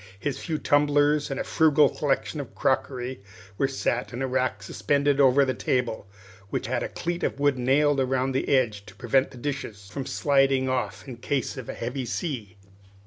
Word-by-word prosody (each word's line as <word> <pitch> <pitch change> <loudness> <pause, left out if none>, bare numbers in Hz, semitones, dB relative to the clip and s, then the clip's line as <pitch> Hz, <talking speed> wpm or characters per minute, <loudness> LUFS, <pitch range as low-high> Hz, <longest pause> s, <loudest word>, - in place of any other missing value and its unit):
His 145 +4 -3
few 160 -3 -3
tumblers 145 0 +2
and 135 - -3
a - - -1
frugal 155 -2 +4
collection 145 +2 -1
of 135 - -11
crockery 130 -2 -1 0.4
were 135 - +3
set 125 -2 -2
in 125 +2 -4
a - - 0
rack 130 0 -1
suspended 145 0 +1
over 135 +1 +5
the 130 - 0
table, 120 -6 -1 0.4
which - - -2
had - - -1
a - - -3
cleat 175 0 -3
of - - -2
wood 145 -2 +2
nailed 140 +3 +3
round 130 0 0
the 130 - -1
edge 115 -7 +2
to - - -13
prevent 130 +3 +1
the 130 - -13
dishes 120 -7 -5
from 135 +4 -5
sliding 135 -2 +2
off 130 +2 -2
in 125 -3 -7
case 130 +1 -2
of 130 -4 -8
a - - -4
heavy 125 +2 -4
sea. 120 - -4
135 Hz, 190 wpm, -26 LUFS, 125-145 Hz, 0.4 s, over